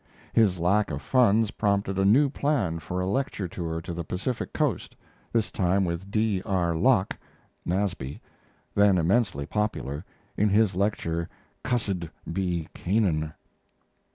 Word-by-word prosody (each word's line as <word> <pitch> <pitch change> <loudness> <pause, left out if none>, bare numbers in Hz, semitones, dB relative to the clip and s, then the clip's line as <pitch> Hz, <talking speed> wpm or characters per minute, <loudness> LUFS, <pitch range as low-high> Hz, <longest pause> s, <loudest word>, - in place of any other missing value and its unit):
His 105 -5 +4
lack 100 +5 +2
of 75 - -3
funds 115 - +3
prompted 100 -2 0
a 95 - +3
new 130 +9 +5
plan 130 - 0
for 90 +3 -4
a 90 - 0
lecture 105 -2 -1
tour 80 -2 -4
to 85 +1 -6
the 85 0 -4
Pacific 105 +9 -3
coast, 145 - -1 0.4
this 115 -2 0
time 95 0 +2
with 85 +3 -4
D. 105 -2 +1
R. 85 -3 0
Locke 105 +2 +3 0.5
(Nasby), 90 -7 -2 0.5
then 100 -2 +5
immensely 90 - +1
popular, 90 -8 -2 0.3
in 105 +1 +2
his 105 -1 +3
lecture 85 -4 -1 0.3
"Cussed 100 -9 -1 0.2
Be 90 -3 -1
Canaan." 85 -6 0
95 Hz, 135 wpm, -27 LUFS, 85-105 Hz, 0.5 s, new